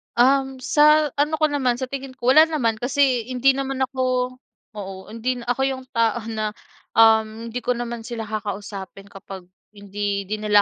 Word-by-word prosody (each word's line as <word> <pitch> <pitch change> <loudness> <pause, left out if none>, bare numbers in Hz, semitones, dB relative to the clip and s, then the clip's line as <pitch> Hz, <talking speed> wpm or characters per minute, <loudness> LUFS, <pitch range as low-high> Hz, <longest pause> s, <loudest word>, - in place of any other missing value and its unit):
Um, 265 +1 +2
sa 300 0 +4
ano 300 +2 +2
ko 310 -1 +2
naman, 260 -4 +1
sa 255 +1 -5
tingin 270 -1 -6
ko 255 -1 +2
wala 310 +4 +7
naman 235 -9 -1
kasi 250 -2 +1
hindi 255 +1 +3
naman 270 0 -2
ako 255 -1 -1 0.5
oo, 195 -1 -6 0.2
hindi 245 +2 -3
ako 245 +2 -1
yung 260 -1 -4
tao 230 0 +1
na 215 -1 -3 0.4
uhm 225 0 +4
hindi 245 - -3
ko 250 0 -1
naman 235 -1 -5
sila 230 -1 -5
kakausapin 200 -2 -6
kapag 195 -1 -10 0.3
hindi 200 0 -3
din 215 +2 -5
nila 205 -1 +6
240 Hz, 170 wpm, -22 LUFS, 215-265 Hz, 0.5 s, wala